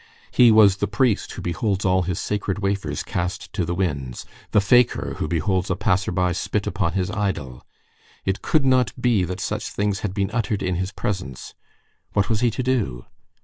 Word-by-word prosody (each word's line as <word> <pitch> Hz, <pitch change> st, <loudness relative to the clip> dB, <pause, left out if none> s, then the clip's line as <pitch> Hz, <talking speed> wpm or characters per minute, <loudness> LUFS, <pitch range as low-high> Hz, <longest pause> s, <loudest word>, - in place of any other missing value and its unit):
He 125 Hz, -1 st, +6 dB
was 105 Hz, -3 st, +6 dB
the -, -, 0 dB
priest 110 Hz, 0 st, +1 dB
who -, -, -7 dB
beholds 95 Hz, +3 st, -1 dB
all 95 Hz, 0 st, +3 dB
his 90 Hz, -1 st, -2 dB
sacred 100 Hz, -2 st, -2 dB
wafers 100 Hz, -7 st, -2 dB
cast 90 Hz, +1 st, -4 dB
to 90 Hz, -, 0 dB
the 85 Hz, +1 st, -2 dB
winds, 70 Hz, -9 st, -2 dB, 0.2 s
the -, -, +4 dB
fakir 120 Hz, +4 st, +3 dB
who -, -, -1 dB
beholds 90 Hz, +4 st, 0 dB
a 95 Hz, -, +1 dB
passer 95 Hz, -1 st, +1 dB
by 90 Hz, 0 st, +1 dB
spit 100 Hz, +3 st, -2 dB
upon 95 Hz, -4 st, -1 dB
his 95 Hz, +1 st, -1 dB
idol. 95 Hz, -, -3 dB, 0.6 s
It 95 Hz, 0 st, -1 dB
could 155 Hz, -4 st, +2 dB
not 130 Hz, -6 st, +2 dB
be 115 Hz, -6 st, +2 dB
that 90 Hz, +2 st, -5 dB
such -, -, -3 dB
things 100 Hz, -1 st, -1 dB
had 95 Hz, -3 st, -4 dB
been 100 Hz, 0 st, 0 dB
uttered 110 Hz, -3 st, -1 dB
in 95 Hz, -, 0 dB
his 95 Hz, +1 st, -2 dB
presence. 90 Hz, -12 st, -4 dB, 0.6 s
What 100 Hz, -1 st, +1 dB
was 110 Hz, -2 st, +1 dB
he 120 Hz, -, +3 dB
to 120 Hz, +3 st, -3 dB
do? 105 Hz, -, -1 dB
95 Hz, 190 wpm, -23 LUFS, 90-105 Hz, 0.6 s, He